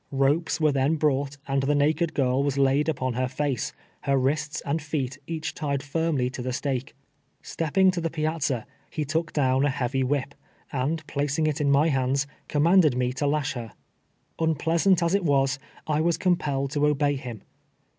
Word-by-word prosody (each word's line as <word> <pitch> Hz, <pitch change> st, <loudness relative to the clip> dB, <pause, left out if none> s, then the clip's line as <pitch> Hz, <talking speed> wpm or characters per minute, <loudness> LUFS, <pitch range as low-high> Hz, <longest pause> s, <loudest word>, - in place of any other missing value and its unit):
Ropes 140 Hz, +4 st, +1 dB
Avere 155 Hz, -3 st, +2 dB
then 140 Hz, +4 st, +2 dB
broii<;lit, 140 Hz, -2 st, 0 dB
and 135 Hz, 0 st, +1 dB
the 145 Hz, +2 st, +1 dB
naked 155 Hz, +3 st, +1 dB
girl 130 Hz, -1 st, +2 dB
was 140 Hz, -1 st, 0 dB
laid 140 Hz, +3 st, +3 dB
upon 130 Hz, -4 st, -1 dB
lier 130 Hz, +2 st, 0 dB
face, 135 Hz, -1 st, -2 dB, 0.4 s
lier 140 Hz, 0 st, +3 dB
wrists 150 Hz, +3 st, 0 dB
and 155 Hz, +3 st, -1 dB
feet 145 Hz, -3 st, -3 dB
each 160 Hz, -1 st, -3 dB
tied 140 Hz, -2 st, -2 dB
firmly 145 Hz, -3 st, 0 dB
to 130 Hz, -1 st, -6 dB
a -, -, 0 dB
stake. 130 Hz, 0 st, -3 dB, 0.5 s
Step 160 Hz, -2 st, -4 dB
ping 190 Hz, -1 st, +6 dB
to 180 Hz, -2 st, -3 dB
the 165 Hz, -, -1 dB
piazza, 155 Hz, -6 st, -1 dB, 0.2 s
he 155 Hz, -, -3 dB
took 160 Hz, +3 st, -1 dB
down 135 Hz, -2 st, +2 dB
a 145 Hz, -, +3 dB
heavy 130 Hz, 0 st, -1 dB
whip, 140 Hz, +1 st, -1 dB, 0.4 s
and 145 Hz, +5 st, -1 dB
])lacing 145 Hz, +2 st, +1 dB
it 150 Hz, 0 st, -1 dB
in 145 Hz, -, +2 dB
my 140 Hz, +3 st, +4 dB
hamls, 135 Hz, +1 st, +1 dB, 0.2 s
coininandcd 155 Hz, -1 st, +4 dB
nie 125 Hz, 0 st, 0 dB
to 140 Hz, +3 st, -2 dB
lasli 145 Hz, -1 st, 0 dB
her. 120 Hz, -3 st, -7 dB, 0.7 s
Uni)leasant 165 Hz, +3 st, +2 dB
as 170 Hz, +2 st, +1 dB
it 200 Hz, -1 st, +2 dB
was, 135 Hz, -3 st, +2 dB, 0.3 s
1 155 Hz, 0 st, +1 dB
was 170 Hz, 0 st, +2 dB
compelled 140 Hz, -7 st, 0 dB
to 150 Hz, 0 st, +2 dB
obey 145 Hz, -1 st, +2 dB
him. 120 Hz, -6 st, -7 dB
145 Hz, 185 wpm, -26 LUFS, 135-155 Hz, 0.7 s, ping